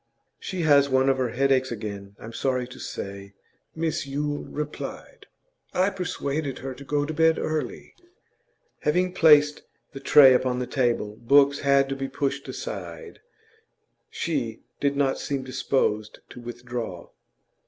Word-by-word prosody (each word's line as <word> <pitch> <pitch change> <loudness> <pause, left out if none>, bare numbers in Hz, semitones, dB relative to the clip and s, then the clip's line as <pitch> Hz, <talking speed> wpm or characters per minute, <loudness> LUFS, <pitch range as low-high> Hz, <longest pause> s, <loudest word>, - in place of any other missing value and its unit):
'She 185 -2 -4
has 140 -2 +5
one 130 0 +3
of 135 - +2
her 125 -2 0
headaches 130 +1 +1
again, 100 -3 -6
I'm 115 +1 -9
sorry 125 0 -1
to 125 - -12
say,' 100 0 -7 0.4
Mrs 160 -3 -1
Yule 145 +1 -2
replied. 150 0 -7 0.5
'I 190 +2 +3
persuaded 150 -6 -3
her 135 0 -6
to 135 - -11
go 145 +1 0
to 155 - -4
bed 160 +1 +3
early.' 155 -1 -3 0.9
Having 180 +4 +1
placed 150 -3 +5 0.3
the 135 - -7
tray 135 -1 +7
upon 125 0 +1
the 125 - -2
table 120 -5 0
books 140 +4 +4
had 140 -1 +3
to 135 - -2
be 135 0 -3
pushed 140 0 -3
aside 485 -2 -7 0.9
she - - -3 0.2
did 140 0 +1
not 135 -2 +1
seem 140 -2 -3
disposed 130 -4 -1
to 125 - -10
withdraw. 120 -5 -6
135 Hz, 145 wpm, -25 LUFS, 125-150 Hz, 0.9 s, tray